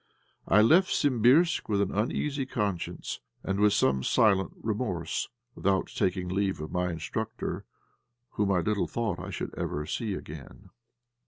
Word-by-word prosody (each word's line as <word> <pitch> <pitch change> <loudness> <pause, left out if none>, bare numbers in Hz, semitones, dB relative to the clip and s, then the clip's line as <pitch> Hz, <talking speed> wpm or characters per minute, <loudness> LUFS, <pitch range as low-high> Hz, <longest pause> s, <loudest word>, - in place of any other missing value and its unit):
I 105 +4 +6
left 175 +11 +5
Simbirsk 140 +5 +3
with 100 -2 +2
an 100 -1 +1
uneasy 135 +6 -1
conscience, 105 -8 -3 0.2
and 95 +1 -1
with 105 0 +5
some 65 -1 +2
silent 95 - +3
remorse, 105 -6 -2 0.2
without 95 -1 0
taking 90 -1 0
leave 95 0 0
of 75 0 -6
my 90 0 0
instructor, 90 +7 -4 0.7
whom 105 -1 0
I 90 -2 +3
little 105 +3 0
thought 110 -6 -2
I 90 +2 -6
should 95 - -5
ever 75 0 -3
see 105 +3 -2
again. 75 -5 -10
100 Hz, 145 wpm, -28 LUFS, 90-110 Hz, 0.7 s, I